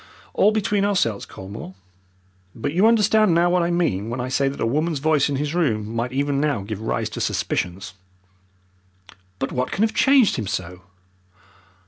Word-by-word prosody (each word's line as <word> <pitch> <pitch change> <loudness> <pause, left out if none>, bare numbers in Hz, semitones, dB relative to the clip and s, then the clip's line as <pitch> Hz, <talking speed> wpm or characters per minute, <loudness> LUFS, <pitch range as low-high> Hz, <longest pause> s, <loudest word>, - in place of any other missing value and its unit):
All 210 - +4
between 210 -1 0
ourselves, 180 - 0
Colmore. 95 -1 -9 0.8
But 140 +6 -3
you 190 +6 +4
understand 215 -4 +4
now 175 +1 +3
what 180 0 +2
I 170 - 0
mean 140 - 0
when 120 +2 -4
I 125 +1 -3
say 135 +1 +1
that 135 - -4
a - - 0
woman's 155 +6 0
voice 150 0 +2
in 140 - -1
his 145 +2 -2
room 115 -10 -1
might 120 +2 -2
even 140 +1 0
now 145 -8 0
give 105 +1 -6
rise 110 - -2
to - - -5
suspicions." 90 +1 -2 1.4
"But 135 - -3
what 125 0 -2
can 200 - 0
have 220 - +1
changed 265 -5 +4
him 110 -4 -3
so?" 90 0 -5
140 Hz, 175 wpm, -22 LUFS, 110-175 Hz, 1.4 s, All